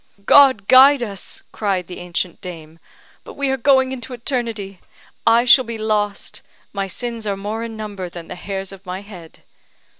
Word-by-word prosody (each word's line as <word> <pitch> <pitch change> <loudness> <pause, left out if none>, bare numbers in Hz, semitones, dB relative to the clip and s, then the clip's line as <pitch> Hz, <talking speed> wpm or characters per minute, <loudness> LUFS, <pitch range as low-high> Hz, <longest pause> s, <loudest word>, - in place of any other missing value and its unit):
"God 260 -8 +6
guide 265 0 +7
us," 200 -4 -7
cried 195 -4 -1
the 180 - -9
ancient 175 0 -4
dame; 165 -3 -10 0.4
"but - - -11
we 280 -1 -1
are - - +1
going 265 0 +3
into 255 -1 -6
eternity. 230 -6 -4 0.5
I 235 +2 +5
shall 260 +1 +7
be 230 -2 -6
lost; 210 -2 -2 0.3
my 195 -1 -2
sins 230 +2 -4
are 200 -1 -1
more 210 +3 -4
in 225 -1 -7
number 200 -4 -6
than 170 -1 -10
the - - -7
hairs 195 +1 -6
of 195 -1 -12
my 185 0 -6
head." 180 -6 -13
210 Hz, 175 wpm, -20 LUFS, 190-240 Hz, 0.5 s, guide